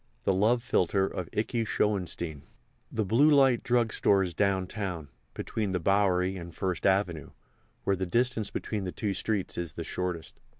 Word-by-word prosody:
THE 95 - +2
LOVE 110 +5 +2
PHILTRE 95 -5 +2
OF 90 -3 -5
IKEY 115 +2 -1
SCHOENSTEIN 90 -8 -1 0.5
The 110 -2 -1
Blue 120 +10 +4
Light 135 -5 +5
Drug 120 -3 +1
Store 100 -1 +3
is 90 -2 -4
downtown, 95 -4 -1 0.3
between 105 -4 -3
the 90 - 0
Bowery 95 0 +2
and 85 -1 -8
First 95 -2 -1
Avenue, 95 -6 +1 0.5
where 100 - +2
the 95 -1 -3
distance 115 +2 +1
between 105 -3 -3
the 90 - -3
two 100 +1 -2
streets 100 -2 -2
is 85 -3 -4
the - - -5
shortest. 90 -3 -4
95 Hz, 165 wpm, -29 LUFS, 90-110 Hz, 0.5 s, Light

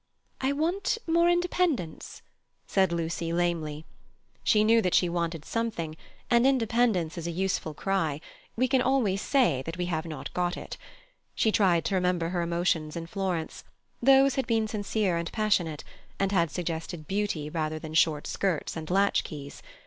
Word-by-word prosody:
"I 265 +1 +1
want 335 +10 0
more 340 +1 +3
independence," 345 - -1 0.4
said 190 -3 +2
Lucy 165 0 -2
lamely; 165 -3 -1 0.6
she 210 -2 +4
knew 225 +1 +5
that 180 -4 +1
she 180 - +4
wanted 170 -2 -2
something, 215 -9 -3 0.3
and 240 +2 +4
independence 230 -10 +1
is 170 - -5
a - - -1
useful 170 -3 -2
cry; 165 -7 -1 0.4
we 255 +3 +2
can 265 0 +3
always 245 -7 +1
say 225 - +2
that 165 +5 -6
we 180 - -1
have 165 -2 -2
not 155 -2 -7
got 180 0 -1
it. - - -7 0.6
She 220 - +2
tried 175 -6 +3
to - - -1
remember 180 -2 +1
her 175 -1 -1
emotions 170 -2 0
in 165 -1 -4
Florence: 180 -2 -3 0.4
those 270 +1 +6
had 265 -3 -1
been 225 -2 +1
sincere 205 -3 -1
and 170 0 -3
passionate, 185 -8 0 0.4
and 195 0 +1
had 170 -4 +2
suggested 165 -1 -4
beauty 195 -6 -1
rather 155 0 -2
than 155 0 -8
short 155 -2 +3
skirts 185 -6 -1
and 160 -1 -6
latch 195 +2 +3
keys. 145 -2 -8
180 Hz, 165 wpm, -28 LUFS, 165-225 Hz, 0.6 s, those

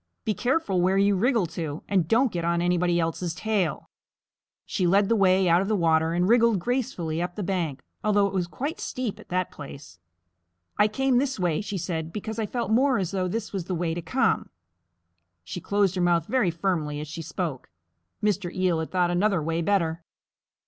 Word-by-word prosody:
Be 215 - +1
careful 240 - 0
where 190 +2 +2
you 200 0 +4
wriggle 230 0 +2
to, 160 -2 -5
and 185 -5 +1
don't 240 +5 +3
get 170 -1 -3
on 170 0 +1
anybody 175 0 +2
else's 165 +1 -2
tail." 195 -7 -1 0.8
She 180 - 0
led 195 +3 +3
the 230 - +4
way 190 -2 +4
out 170 +1 +5
of 195 - -2
the 215 - +1
water 160 -2 +2
and 175 +1 +1
wriggled 235 -1 +4
gracefully 175 -7 -2
up 175 0 -3
the 210 - -3
bank, 170 -7 -2 0.2
although 205 -1 +3
it 200 - -2
was 180 -2 0
quite 280 - -4
steep 250 -5 -4
at - - -15
that 185 0 -1
place. 140 -9 -11 0.8
"I 210 - +4
came 255 +3 +2
this 265 -4 -1
way," 175 -2 +1
she 205 -1 -4
said, 160 -2 -3
"because 220 +4 -5
I 215 - -1
felt 235 -1 -3
more 255 +3 +4
as 185 -2 -2
though 185 -2 -1
this 225 +5 -4
was 190 -4 -3
the 185 - -2
way 165 -1 -1
to 170 - -4
come." 255 +7 0 0.9
She 170 - -6
closed 200 -1 +1
her 185 - -1
mouth 170 -2 +2
very 245 -3 +1
firmly 165 -4 -1
as 150 - -5
she 160 +3 -6
spoke. 160 -4 -4 0.5
Mr. 200 -4 0
Eel 185 -3 +1
had 160 - -3
thought 180 -2 +1
another 190 +1 +2
way 165 +2 -1
better. 170 -3 0
185 Hz, 200 wpm, -26 LUFS, 170-210 Hz, 0.9 s, out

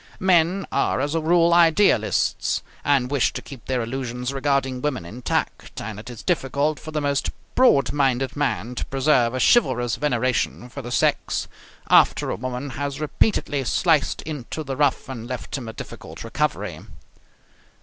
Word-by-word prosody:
Men 185 +1 +3
are - - +1
as 145 +3 -1
a 165 - +1
rule 170 +1 +4
idealists, 170 +4 +3 0.2
and 135 -3 +2
wish 140 -3 +2
to - - -5
keep 135 -4 -12
their 130 -2 0
illusions 125 +1 -4
regarding 135 -2 0
women 135 -11 -2
intact, 115 +8 -3
and 105 -1 -6
it 115 - -9
is 120 -3 -9
difficult 145 -2 0
for 155 - -9
the 155 -1 -2
most 140 -1 0 0.2
broad 140 - +4
minded 135 -2 +1
man 125 -6 -1
to - - -4
preserve 130 -3 +2
a - - -1
chivalrous 125 - +3
veneration 125 -2 -1
for - - -7
the 120 - -7
sex - - 0 0.4
after - - +4
a - - -1
woman 130 +3 -5
has 140 +1 -4
repeatedly 150 -2 0
sliced 155 +3 +1
into 155 0 -5
the 135 -2 -4
rough 145 -1 +1
and 120 -3 -7
left 125 -1 -5
him 130 -5 -5
a 110 - -6
difficult - - -9
recovery. - - -2
135 Hz, 160 wpm, -23 LUFS, 125-150 Hz, 0.4 s, rule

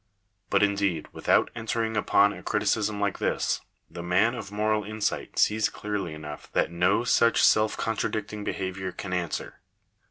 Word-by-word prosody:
But, - - +3
indeed, 100 -5 0
without - - +2
entering 115 -1 -2
upon 105 0 +4
a - - -10
criticism 105 0 0
like 100 -2 -1
this, - - 0 0.3
the 85 +1 -8
man 90 +7 +2
of 110 -5 -7
moral 105 +1 0
insight 110 0 -3
sees 110 0 +3
clearly 100 -6 -4
enough 75 -1 -9
that - - +1
no 90 +6 +2
such 115 -1 +3
self 110 0 +4
contradicting 110 -1 -2
behaviour 95 -1 -3
can 90 +1 -6
answer. 85 -3 -3
105 Hz, 150 wpm, -27 LUFS, 95-110 Hz, 0.3 s, upon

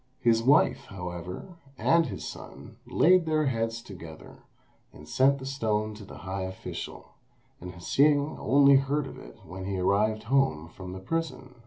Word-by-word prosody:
His 115 -2 +3
wife, 140 +6 +3
however, 90 - -7 0.2
and 165 +2 +3
his - - -6
son, - - -10
laid 180 -1 +4
their 155 -1 +2
heads 115 -2 -1
together, 85 -7 -11 0.5
and 75 - -14
sent 135 +1 +3
the 130 - -8
stone 110 -5 -1
to 105 0 -11
the 95 - -11
high 95 +1 -3
official, 95 0 -7 0.5
and 90 +1 -8
Hsing 145 - +2
only 140 +2 +6
heard 140 +2 0
of 135 - -9
it - - -13
when 95 +3 -7
he 95 0 -2
arrived 105 +4 +1
home 115 - +1
from 90 +1 -9
the 95 - -6
prison. 160 +2 -4
115 Hz, 160 wpm, -28 LUFS, 95-140 Hz, 0.5 s, only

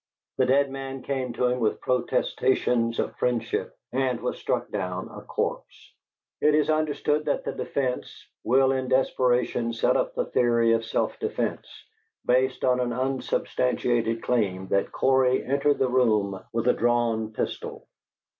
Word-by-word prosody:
The 130 - +4
dead 140 +1 +3
man 135 -1 -6
came 130 -3 -2
to 125 - 0
him 125 0 +1
with 110 -3 0
protestations 125 -1 +1
of - - -2
friendship 120 -2 -1
and 130 -1 0
was - - -3
struck - - -2
down 95 -2 -3
a - - -8
corpse. - - -4 0.5
It 150 0 +4
is 155 0 +2
understood 150 -1 0
that 145 - 0
the - - -3
defence 130 -3 -3 0.2
will 130 +2 +4
in 130 -1 -1
desperation 125 -2 +1
set 115 - +2
up - - 0
the - - 0
theory 115 -1 +2
of 115 0 0
self 115 - -1
defence, - - -2 0.6
based 130 +1 +2
on 125 -1 +3
an 125 -1 0
unsubstantiated 125 -2 0
claim 95 -6 0
that 100 - +1
Cory 130 -1 +2
entered 140 +2 +2
the 130 - +2
room 105 -7 +1
with 115 +1 -1
a - - +5
drawn 115 -2 +1
pistol. - - -5
125 Hz, 150 wpm, -26 LUFS, 115-135 Hz, 0.6 s, a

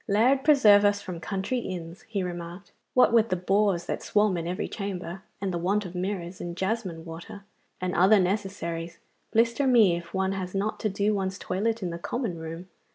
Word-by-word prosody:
'Lard 245 +6 +3
preserve 215 -9 +6
us 205 0 +3
from 180 -4 -7
country 195 +8 -2
inns!' 175 -5 -6
he 205 -4 -2
remarked. 175 +1 -7 0.2
'What 250 - +5
with 230 -1 +4
the 185 - +1
boors 190 0 +1
that - - -3
swarm 210 -2 +2
in 170 -1 -3
every 180 +1 -2
chamber, 190 -3 -5 0.2
and 195 -2 -2
the 170 - -1
want 200 +4 0
of 180 - -7
mirrors, 180 -1 -4
and 175 0 -5
jasmine 190 -5 -2
water, 170 +4 -9 0.4
and 185 0 -2
other 195 +4 +5
necessaries, 180 -3 -2 0.3
blister 235 +4 +2
me 220 -9 +5
if 170 0 -7
one 190 0 0
has 190 -1 -4
not 205 +2 -1
to 215 - 0
do 200 +2 +1
one's 190 -1 -2
toilet 220 +4 -1
in 175 - -2
the 170 - -5
common 210 -3 -3
room. 165 +2 -7
190 Hz, 195 wpm, -27 LUFS, 175-210 Hz, 0.4 s, preserve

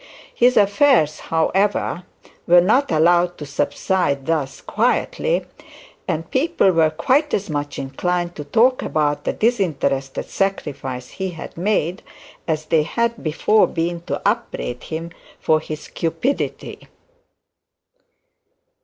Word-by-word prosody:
His 250 +1 +3
affairs, 200 - +4
however, 180 +2 0 0.4
were 175 0 +7
not 220 +9 +2
allowed 175 +2 +3
to 150 - -7
subside 145 -1 -1
thus 150 -5 -1
quietly, - - 0 0.6
and 165 -1 -3
people 290 - +2
were 165 -2 +3
quite 260 - +1
as 200 -4 -4
much 145 -1 -3
inclined 175 +6 -2
to 150 - -6
talk 235 - +3
about 145 -1 -1
the - - 0
disinterested 155 - -1
sacrifice 135 -10 -3
he 190 -1 -4
had 165 -3 -9
made, 180 -1 0 0.5
as 155 -1 -1
they 160 0 +3
had 235 +8 -1
before 185 +7 +3
been 170 +1 -2
to - - -2
upbraid 205 - -2
him 165 +1 -5 0.3
for 155 0 +2
his 155 -1 -7
cupidity. 170 - -3
170 Hz, 120 wpm, -21 LUFS, 155-205 Hz, 0.6 s, were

